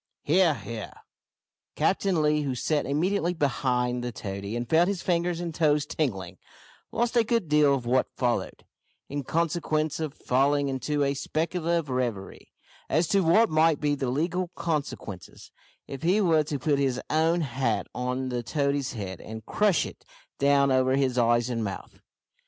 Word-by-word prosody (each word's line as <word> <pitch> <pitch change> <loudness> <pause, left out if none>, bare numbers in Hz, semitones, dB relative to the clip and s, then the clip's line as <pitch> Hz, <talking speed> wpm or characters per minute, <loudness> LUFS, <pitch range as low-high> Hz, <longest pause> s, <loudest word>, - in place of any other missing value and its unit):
"He 170 +6 +3
ar, 165 -5 +4
he 110 0 -6
ar!" 105 - -10 0.7
Captain 190 -4 +1
Lee, 150 0 +2
who 135 -3 -2
sat 150 +4 0
immediately 175 +4 0
behind 125 -4 0
the 120 - -3
toady 100 0 -5
and 120 0 -3
felt 165 +5 +4
his 200 -3 -2
fingers 175 -1 0
and 170 -2 -4
toes 150 -2 +2
tingling, 95 - -3 0.5
lost 240 +1 -1
a 235 - +5
good 230 -5 0
deal 150 -2 +4
of 125 -3 -5
what 125 +2 +2
followed, 120 -2 -1 0.4
in 145 0 -3
consequence 155 -1 -1
of 155 -2 -4
falling 140 +2 +1
into 135 +3 -1
a 140 0 +1
speculative 165 +2 -1
reverie, 120 -6 -3 0.4
as 160 +3 +2
to 200 - +3
what 190 +6 +4
might 155 -1 +3
be 145 -1 +1
the 135 -3 -2
legal 170 +7 -1
consequences, 145 - -5 0.4
if 135 - -7
he 180 +5 +3
were 165 -6 +3
to 150 -1 -3
put 140 +1 +1
his 130 -3 0
own 165 +3 +2
hat 130 -5 -1
on 125 +1 -2
the 125 -1 -2
toady's 140 +1 -1
head, 95 -6 -6
and 110 0 -8
crush 205 -5 +2
it - - -10 0.4
down 140 -1 +4
over 130 0 +3
his 130 -2 +1
eyes 120 0 +3
and 115 -3 -2
mouth. 100 -2 -6
145 Hz, 170 wpm, -27 LUFS, 125-165 Hz, 0.7 s, a